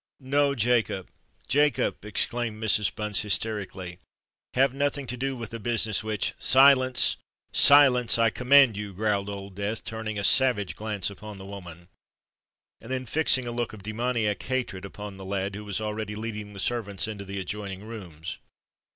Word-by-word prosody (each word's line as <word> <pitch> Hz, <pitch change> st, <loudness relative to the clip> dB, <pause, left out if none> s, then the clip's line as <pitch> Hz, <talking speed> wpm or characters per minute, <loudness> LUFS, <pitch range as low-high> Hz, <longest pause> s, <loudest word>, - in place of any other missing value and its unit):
"No, 140 Hz, +1 st, +2 dB
Jacob—Jacob!" 120 Hz, +5 st, 0 dB
exclaimed 110 Hz, +1 st, -1 dB
Mrs. 105 Hz, -2 st, +3 dB
Bunce 105 Hz, -2 st, -1 dB
hysterically: 100 Hz, -4 st, -3 dB, 0.6 s
"have 130 Hz, 0 st, +3 dB
nothing 140 Hz, 0 st, -1 dB
to 125 Hz, 0 st, -3 dB
do 135 Hz, +2 st, -2 dB
with 115 Hz, -3 st, -8 dB
a 115 Hz, -, -5 dB
business 110 Hz, -2 st, 0 dB
which——" 110 Hz, -2 st, -1 dB
"Silence—silence, 130 Hz, -1 st, +5 dB
I 115 Hz, -1 st, +3 dB
command 125 Hz, -1 st, +5 dB
you!" 105 Hz, -1 st, -6 dB
growled 100 Hz, -1 st, 0 dB
Old 100 Hz, -1 st, -7 dB
Death, 100 Hz, +3 st, -3 dB
turning 110 Hz, -1 st, -5 dB
a 100 Hz, -, -2 dB
savage 125 Hz, -5 st, +3 dB
glance 105 Hz, -3 st, -3 dB
upon 105 Hz, +1 st, -10 dB
the 95 Hz, -, -10 dB
woman, 90 Hz, -4 st, -10 dB, 0.9 s
and 115 Hz, -, -10 dB
then 130 Hz, -1 st, -2 dB
fixing 130 Hz, 0 st, +2 dB
a 120 Hz, -, -4 dB
look 120 Hz, -1 st, -3 dB
of 105 Hz, -3 st, -11 dB
demoniac 110 Hz, -1 st, -1 dB
hatred 120 Hz, -7 st, -3 dB
upon 105 Hz, 0 st, -8 dB
the 95 Hz, -, -9 dB
lad, 100 Hz, 0 st, -2 dB
who 105 Hz, +1 st, -7 dB
was 100 Hz, -1 st, -2 dB
already 105 Hz, -1 st, -4 dB
leading 105 Hz, -1 st, -6 dB
the 100 Hz, -, -9 dB
servants 100 Hz, -3 st, -1 dB
into 105 Hz, -2 st, -6 dB
the 100 Hz, 0 st, -6 dB
adjoining 100 Hz, 0 st, -6 dB
rooms. 95 Hz, -8 st, -8 dB
110 Hz, 155 wpm, -26 LUFS, 100-125 Hz, 0.9 s, Silence—silence